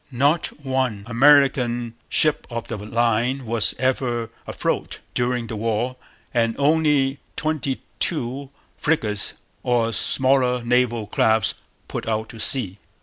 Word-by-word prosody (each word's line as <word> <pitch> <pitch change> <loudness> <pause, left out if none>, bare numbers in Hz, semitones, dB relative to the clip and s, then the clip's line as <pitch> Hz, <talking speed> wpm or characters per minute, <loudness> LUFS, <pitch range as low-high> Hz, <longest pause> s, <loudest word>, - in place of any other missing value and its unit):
Not 140 +6 +1 0.2
one 130 -6 -1
American 120 -2 +3 0.2
ship 155 -1 +3
of 115 -2 -6
the 115 - -4
line 120 +4 0
was 115 -1 +2
ever 120 -2 -1 0.2
afloat - - -2 0.2
during 125 -1 -1
the 115 - -6
war; 115 +3 -1 0.4
and 115 -2 +1
only 145 -2 +2 0.2
twenty 155 -4 -2 0.2
two 135 -2 0 0.3
frigates 110 -10 -1 0.3
or 115 -2 +1
smaller 130 -2 +3
naval 120 -2 +1
craft 110 +1 +2 0.3
put - - -5
out 110 0 -2
to 115 - -11
sea. 105 -5 +3
120 Hz, 120 wpm, -22 LUFS, 115-135 Hz, 0.4 s, American